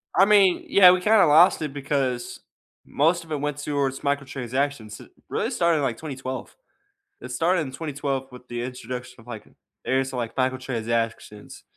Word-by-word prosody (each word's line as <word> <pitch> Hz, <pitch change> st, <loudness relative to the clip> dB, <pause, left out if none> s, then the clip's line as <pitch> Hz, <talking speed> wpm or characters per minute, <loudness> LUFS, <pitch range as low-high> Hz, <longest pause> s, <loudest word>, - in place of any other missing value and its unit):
I 190 Hz, -, +6 dB
mean, 200 Hz, -3 st, +4 dB
yeah, 185 Hz, -2 st, +8 dB
we 180 Hz, 0 st, +1 dB
kinda 215 Hz, +2 st, +5 dB
lost 160 Hz, +4 st, +5 dB
it 150 Hz, -3 st, -4 dB
because 135 Hz, -3 st, -2 dB, 0.5 s
most 165 Hz, +4 st, +1 dB
of 160 Hz, -, -16 dB
it 150 Hz, -, -1 dB
went 145 Hz, -1 st, -2 dB
towards 140 Hz, -2 st, -2 dB
microtransactions. 135 Hz, -4 st, -3 dB
It -, -, -16 dB, 0.2 s
really -, -, -1 dB
started 170 Hz, -1 st, +1 dB
in, 145 Hz, -, -1 dB
like, 120 Hz, -4 st, -1 dB
2012. 130 Hz, -3 st, -7 dB, 0.7 s
It -, -, -9 dB
started 175 Hz, +1 st, +1 dB
in 130 Hz, -, -7 dB
2012 140 Hz, -3 st, -4 dB
with 125 Hz, 0 st, -13 dB
the 120 Hz, 0 st, -4 dB
introduction 125 Hz, 0 st, -7 dB
of, 115 Hz, -, -19 dB
like, 110 Hz, -3 st, -8 dB, 0.4 s
areas 130 Hz, 0 st, 0 dB
of, 125 Hz, -, -4 dB
like, 115 Hz, -1 st, -4 dB
microtransactions, 115 Hz, -4 st, -3 dB
135 Hz, 170 wpm, -24 LUFS, 125-155 Hz, 0.7 s, yeah